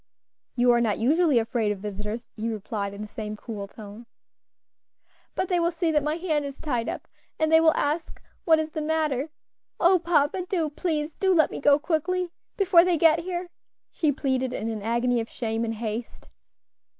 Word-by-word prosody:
"You 245 Hz, 0 st, +4 dB
are 240 Hz, 0 st, +3 dB
not 215 Hz, -4 st, +1 dB
usually 300 Hz, +4 st, +3 dB
afraid 225 Hz, -2 st, +1 dB
of 205 Hz, -, -3 dB
visitors," 210 Hz, +3 st, -5 dB
he 220 Hz, +2 st, -3 dB
replied 205 Hz, -2 st, -4 dB
in 205 Hz, -, -6 dB
the -, -, -7 dB
same 215 Hz, 0 st, -6 dB
cool 210 Hz, -3 st, -6 dB
tone. 215 Hz, +3 st, -11 dB, 1.3 s
"But -, -, -1 dB
they 355 Hz, -1 st, +1 dB
will 340 Hz, 0 st, +2 dB
see 335 Hz, -1 st, -1 dB
that 300 Hz, -1 st, +3 dB
my 300 Hz, +2 st, -1 dB
hand 320 Hz, -4 st, -1 dB
is 280 Hz, -1 st, -7 dB
tied 245 Hz, -6 st, -2 dB
up, -, -, -6 dB, 0.3 s
and 315 Hz, 0 st, +1 dB
they 320 Hz, 0 st, +7 dB
will 320 Hz, -1 st, +4 dB
ask 305 Hz, +4 st, -2 dB, 0.2 s
what 320 Hz, -2 st, +5 dB
is 315 Hz, 0 st, -2 dB
the 310 Hz, -, -3 dB
matter. 305 Hz, -2 st, 0 dB, 0.5 s
O 360 Hz, +1 st, +5 dB
papa! 335 Hz, +1 st, +1 dB
do, 325 Hz, -6 st, 0 dB
please 310 Hz, -1 st, -2 dB
do 380 Hz, -2 st, +2 dB
let 315 Hz, -3 st, +4 dB
me -, -, -5 dB
go 285 Hz, 0 st, +5 dB
quickly, 345 Hz, +3 st, -1 dB, 0.3 s
before 375 Hz, -4 st, +6 dB
they 360 Hz, -2 st, +2 dB
get 325 Hz, 0 st, +5 dB
here," 350 Hz, 0 st, -4 dB, 0.4 s
she 310 Hz, -3 st, +1 dB
pleaded 260 Hz, -3 st, -1 dB
in 220 Hz, +3 st, -3 dB
an 220 Hz, -2 st, -4 dB
agony 235 Hz, +3 st, +1 dB
of 225 Hz, -, -4 dB
shame 225 Hz, -1 st, -2 dB
and 225 Hz, 0 st, -2 dB
haste. 225 Hz, +1 st, -5 dB
290 Hz, 190 wpm, -26 LUFS, 225-325 Hz, 1.3 s, they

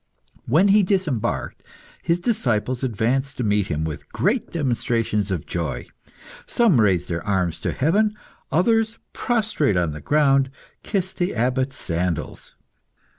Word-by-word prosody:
When 165 Hz, +11 st, +4 dB
he 210 Hz, +2 st, +6 dB
disembarked, 180 Hz, -, -1 dB, 0.4 s
his 170 Hz, +1 st, +1 dB
disciples 130 Hz, -, 0 dB
advanced 130 Hz, +3 st, 0 dB
to 125 Hz, -, -1 dB
meet 105 Hz, -2 st, +1 dB
him 75 Hz, +1 st, -2 dB
with 80 Hz, -2 st, -6 dB
great 210 Hz, +6 st, 0 dB
demonstrations 115 Hz, -, 0 dB
of 90 Hz, -5 st, -2 dB
joy. 85 Hz, -6 st, -3 dB, 0.6 s
Some 210 Hz, -, +4 dB
raised 95 Hz, -4 st, +2 dB
their 85 Hz, -1 st, -3 dB
arms 95 Hz, -5 st, 0 dB
to -, -, -2 dB
heaven; 210 Hz, +9 st, +2 dB, 0.4 s
others, 225 Hz, +5 st, +2 dB, 0.2 s
prostrate 215 Hz, -, +1 dB
on 85 Hz, -3 st, +1 dB
the 75 Hz, 0 st, -7 dB
ground, 135 Hz, -, +3 dB, 0.3 s
kissed 190 Hz, -2 st, -2 dB
the 175 Hz, -6 st, -1 dB
Abbot's 130 Hz, +3 st, 0 dB
sandals. 85 Hz, -1 st, -3 dB
130 Hz, 130 wpm, -23 LUFS, -, 0.6 s, he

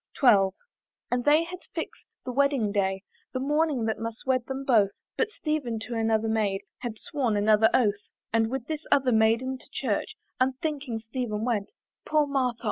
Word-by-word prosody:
XII. 210 Hz, -8 st, +6 dB, 0.6 s
And 245 Hz, 0 st, 0 dB
they 300 Hz, +3 st, +5 dB
had 355 Hz, +2 st, -7 dB, 0.2 s
fix'd -, -, -5 dB, 0.2 s
the 255 Hz, -, -3 dB
wedding 275 Hz, -5 st, +2 dB
day, 195 Hz, -1 st, 0 dB, 0.3 s
The 255 Hz, -, -1 dB
morning 295 Hz, -2 st, +1 dB
that 220 Hz, -1 st, -1 dB
must 225 Hz, 0 st, -6 dB
wed 255 Hz, -2 st, +1 dB
them 270 Hz, 0 st, -4 dB
both; 220 Hz, -7 st, +4 dB, 0.3 s
But 455 Hz, -, +1 dB
Stephen 305 Hz, -, -2 dB
to 240 Hz, -, -5 dB
another 225 Hz, -1 st, +1 dB
maid 210 Hz, -3 st, 0 dB, 0.2 s
Had 240 Hz, -3 st, -5 dB
sworn 245 Hz, -4 st, -1 dB
another 215 Hz, +1 st, +5 dB
oath; 210 Hz, -4 st, +1 dB, 0.3 s
And 225 Hz, -1 st, +3 dB
with 260 Hz, -1 st, -3 dB
this 310 Hz, +1 st, -4 dB
other 265 Hz, -2 st, +4 dB
maid 220 Hz, +1 st, +4 dB
to 260 Hz, 0 st, -5 dB
church -, -, -2 dB, 0.2 s
Unthinking 265 Hz, -2 st, -1 dB
Stephen 225 Hz, -2 st, -3 dB
went 230 Hz, -, -1 dB, 0.3 s
Poor 305 Hz, -1 st, +2 dB
Martha! 260 Hz, -4 st, 0 dB
245 Hz, 170 wpm, -27 LUFS, 220-275 Hz, 0.6 s, XII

